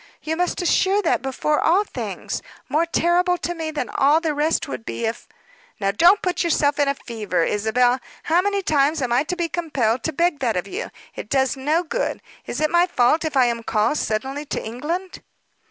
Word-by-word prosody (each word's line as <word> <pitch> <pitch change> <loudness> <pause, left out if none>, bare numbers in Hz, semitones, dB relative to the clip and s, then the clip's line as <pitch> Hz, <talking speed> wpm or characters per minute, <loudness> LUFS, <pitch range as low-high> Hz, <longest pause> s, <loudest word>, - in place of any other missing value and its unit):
You 315 +1 -1
must 355 +1 -1
assure 385 +3 +2
that, 330 - +1
before 275 +3 0
all 365 +5 +4
things. - - -5 0.3
More 325 +3 +1
terrible 355 +2 +2
to 350 - -3
me 325 -2 -4
than 295 -6 -3
all 285 +8 +3
the 320 -2 -1
rest 300 +2 0
would 130 - -4
it 115 - -26
be, 115 0 -3
if 225 +1 -4 0.3
" - - -30
"Now 195 -1 +1
don't 350 - +5
put 360 0 0
yourself 295 -3 +1
in 285 - +3
a 280 - +1
fever, 210 -9 -2
Isabel. 245 +6 +2 0.2
How 335 +2 +3
many 400 0 -1
times 295 -1 +2
am 240 -1 0
I 245 - +4
to 360 - -2
be 345 -2 -1
compelled 270 -9 -1
to 320 - 0
beg 335 0 +1
that 235 -7 0
of 180 - -3
you! - - -5 0.2
It - - -8
does 265 -1 +2
no 300 +6 0
good. 480 +9 -3 0.2
Is - - -4
it 305 0 +1
my 345 +1 +4
fault, 305 0 +2
if 310 -3 -2
I 255 - +6
am 235 -1 -1
called 225 +6 +1
suddenly 265 +7 -2
to - - -4
England?" 320 +11 -4
300 Hz, 215 wpm, -22 LUFS, 245-345 Hz, 0.3 s, I